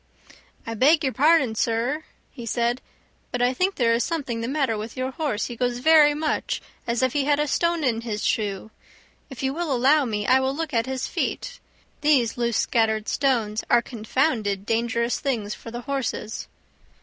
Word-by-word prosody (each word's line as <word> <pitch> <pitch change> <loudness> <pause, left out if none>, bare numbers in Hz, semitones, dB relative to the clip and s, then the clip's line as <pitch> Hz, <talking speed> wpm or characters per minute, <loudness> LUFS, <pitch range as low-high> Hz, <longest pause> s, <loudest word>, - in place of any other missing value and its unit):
"I 230 - -4
beg 285 +7 +4
your 265 -2 0
pardon, 290 -4 +4
sir," 235 +7 -1 0.3
he 245 - -9
said, 240 +2 0 0.5
"but 245 - -2
I 245 +1 +2
think 375 +7 0
there 230 -3 +2
is 235 - +1
something 270 -9 -3
the 230 - -2
matter 270 -4 0
with 215 +3 -6
your 255 +1 -2
horse; 265 -6 -2
he 240 - -6
goes 245 0 -1
very 295 +2 +5
much 305 0 -1 0.3
as 235 +2 0
if 260 - +1
he 285 -2 +1
had 290 0 +2
a 300 - +1
stone 340 +2 +1
in 230 -4 +1
his 215 -3 -4
shoe. 210 0 -1 0.6
If 265 -2 -8
you 265 0 0
will 335 -1 -2
allow 275 +3 +4
me 210 -3 -2
I 255 +3 +5
will 265 +1 -1
look 320 -1 -4
at 230 +1 +1
his 260 -1 -2
feet; - - -3 0.4
these 275 -6 +3
loose 235 -2 0
scattered 220 -2 +1
stones 230 -6 0
are 235 - +4
confounded 220 -4 -1
dangerous 235 +1 0
things 220 -7 -2
for - - -10
the 240 +1 -6
horses." 260 -5 -3
245 Hz, 185 wpm, -24 LUFS, 230-285 Hz, 0.6 s, very